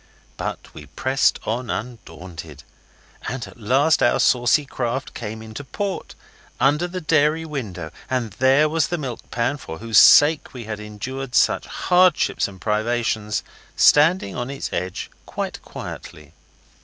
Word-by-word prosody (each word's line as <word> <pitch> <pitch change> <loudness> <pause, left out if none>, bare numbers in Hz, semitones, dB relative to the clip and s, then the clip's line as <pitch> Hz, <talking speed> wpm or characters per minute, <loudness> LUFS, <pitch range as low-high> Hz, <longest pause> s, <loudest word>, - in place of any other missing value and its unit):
But - - -6
we 75 -2 -11
pressed 130 - +1
on 120 +3 -3
undaunted, 85 - -7 0.6
and 125 0 -4
at - - -14
last 135 +8 +3
our - - +3
saucy 125 +4 +3
craft 130 0 -3
came 110 -1 -6
into 110 +5 -8
port, 195 +7 -5 0.4
under 150 +6 +2
the 180 +1 -5
dairy 155 0 +2
window 100 - -5 0.2
and 125 -4 -1
there 135 +4 +5
was 160 +1 +1
the 175 - -2
milk 130 -7 -6
pan, 120 +4 -1
for 80 - -8
whose 115 +2 +4
sake 150 -2 +6
we 120 - -6
had 110 -1 -6
endured 125 +5 -6
such - - +3
hardships 180 -2 +2
and 95 -2 -12
privations, 110 0 -1 0.3
standing 150 - +4
up - - -5
on 120 - -4
its 140 0 -5
edge 90 0 -4 0.2
quite - - -5
quietly. 75 0 -9
125 Hz, 145 wpm, -22 LUFS, 105-145 Hz, 0.6 s, sake